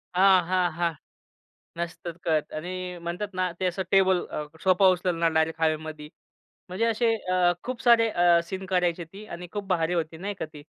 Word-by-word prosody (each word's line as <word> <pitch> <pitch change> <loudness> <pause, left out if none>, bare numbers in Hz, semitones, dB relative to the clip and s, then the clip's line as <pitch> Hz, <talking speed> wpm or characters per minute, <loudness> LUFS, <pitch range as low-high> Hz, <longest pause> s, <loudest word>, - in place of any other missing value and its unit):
हां, 190 0 +6
हां, 180 -2 +1
हां. 170 0 0 0.8
नसतात 170 0 -5
कळत 155 -2 0
आणि 170 +4 -5 0.3
म्हणतात 180 +4 -4
ना, 185 0 0
ते 185 - +1
असं 180 +1 -1
टेबल 190 -2 +4
अ, - - -3 0.2
सोफा 190 +1 +4
उचलणार 175 -2 0
डायरेक्ट 160 +1 0
हवेमधी. 155 -1 -1 0.6
म्हणजे 190 +6 -1
असे 230 0 +2 0.2
अ, 180 -1 +4
खूप 255 -1 -5
सारे 230 -2 +5
अ, 175 -3 +4
सीन 190 +2 -6
करायची 180 -2 0
होती 195 +6 -11
आणि 180 +1 -7
खूप 205 -1 -4
भारी 170 -2 +1
होती, 160 -1 -2
नाही 200 +4 -4
का - - -2
ती? 145 - -10
180 Hz, 180 wpm, -26 LUFS, 165-190 Hz, 0.8 s, हां